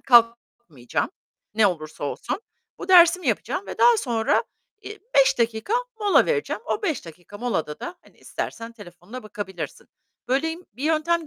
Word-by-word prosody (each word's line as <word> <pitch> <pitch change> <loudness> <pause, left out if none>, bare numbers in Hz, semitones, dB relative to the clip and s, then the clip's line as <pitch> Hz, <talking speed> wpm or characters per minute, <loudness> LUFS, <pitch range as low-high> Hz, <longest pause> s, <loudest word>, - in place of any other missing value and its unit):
kalkmayacağım. 230 - +2 0.4
Ne 215 -2 +5
olursa 155 -5 -3
olsun. 145 - -3 0.4
Bu - - -7
dersimi 355 0 +7
yapacağım 395 - -1
ve - - -7
daha 475 -1 +7
sonra, 235 - +1 0.4
iii, 420 0 -9
5 - - +5
dakika 230 - 0 0.3
mola 410 -1 +5
vereceğim. 455 -2 -1
O 430 - -1
5 315 - -1
dakika 175 +5 -12
molada 160 -11 -2
da, 350 - -5
hani, - - -23
istersen 230 0 -5
telefonuna 205 +2 -11
bakabilirsin. 205 -5 -7 0.4
Böyle 275 +6 +1
im 340 +3 -8
bir 250 +7 -10
yöntem 320 +1 +1
240 Hz, 150 wpm, -24 LUFS, 205-340 Hz, 0.4 s, dersimi